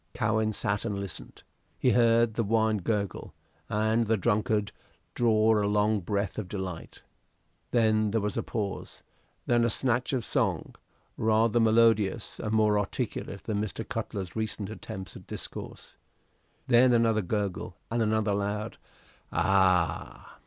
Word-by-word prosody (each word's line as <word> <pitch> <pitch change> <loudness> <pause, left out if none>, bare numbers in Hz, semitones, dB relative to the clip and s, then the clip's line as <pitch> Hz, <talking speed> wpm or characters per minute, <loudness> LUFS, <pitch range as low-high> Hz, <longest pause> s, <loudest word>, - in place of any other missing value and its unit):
Cowen 110 0 +1
sat 105 0 -2
and 105 -3 -2
listened. 100 -4 -8 0.3
He 125 - +2
heard 115 -1 +4
the 115 - 0
wine 110 0 +2
gurgle, 100 0 -3 0.3
and 110 +2 +1
the 110 0 +2
drunkard 105 0 0 0.4
draw 110 -2 +3
a - - +1
long 105 +1 +2
breath 100 +3 -2
of 105 - -5
delight. 90 -3 -6 0.7
Then 110 -2 +2
there 110 +2 +1
was 105 -1 -2
a - - 0
pause; 100 -4 -5 0.4
then 120 -1 +3
a 115 - +3
snatch 125 +2 0
of 125 -5 -1
song, - - -1 0.4
rather 110 +1 +2
melodious 110 -2 +2
and 110 - -3
more 105 -1 +3
articulate 100 0 -4
than 105 -2 -2
Mr. 110 +1 -4
Cutler's 100 -5 -4
recent 110 -2 -3
attempts 95 -3 -8
at - - -12
discourse. - - -7 0.7
Then 125 0 +5
another 115 -2 +3
gurgle 100 -2 -3
and 115 0 0
another 110 -1 +1
loud 105 +2 -3 0.5
"Ah!" 95 -3 +1
110 Hz, 140 wpm, -28 LUFS, 100-115 Hz, 0.7 s, Then